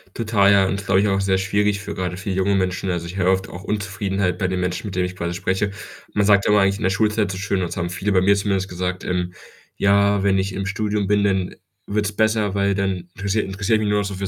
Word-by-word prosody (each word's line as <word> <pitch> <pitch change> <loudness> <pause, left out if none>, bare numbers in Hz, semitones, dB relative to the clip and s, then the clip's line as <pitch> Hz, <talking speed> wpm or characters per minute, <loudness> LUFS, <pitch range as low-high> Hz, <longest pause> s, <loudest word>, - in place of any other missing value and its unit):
Total, 105 -3 +3
ja. 100 -1 +5
Und 95 - -1
ist, 100 0 -6
glaube 95 0 +4
ich, 105 - +2
auch 95 -1 +1
sehr 95 -1 +2
schwierig 100 +1 +1
für 100 - -6
gerade 90 -1 -3
für 100 +2 -6
junge 95 +1 +1
Menschen. 95 0 -1
Also, 85 -1 -3
ich 85 +2 -7
höre 95 -1 +3
oft 95 0 0
auch 90 - -9
Unzufriedenheit 95 -2 -2
bei 90 - 0
den 90 0 -2
Menschen, 90 +3 -2
mit 95 - -6
denen 90 -1 +1
ich 90 0 -6
quasi 85 -1 -3
spreche. 95 +3 -1 0.4
Man 100 -1 +2
sagt 100 -1 +4
immer 105 0 +4
eigentlich 95 0 +2
in - - -6
der 95 - +3
Schulzeit 105 0 +1
so 95 - -5
schön 100 0 -1
und 90 - -3
so, - - -4
haben 85 0 -2
viele 95 +3 -2
bei 95 -2 +4
mir 100 +2 +4
zumindest 100 -1 -1
gesagt, 90 0 -4
ähm: 90 0 -2 0.4
„Ja, 100 0 +3
wenn 100 -1 +2
ich 95 0 -1
im 95 0 -3
Studium 105 0 -1
bin, 105 0 +2
dann, 95 -2 +1
äh, - - -18 0.3
wird's 105 0 -1
besser, 110 -1 +1
weil 100 0 +1
dann 95 -3 -2
interessiere 100 +2 -1
interessiere 100 +3 0
mich 110 - -1
nur 105 0 +2
noch 100 - -1
so 100 - -5
für 95 +1 -3
100 Hz, 275 wpm, -21 LUFS, 95-100 Hz, 0.4 s, ja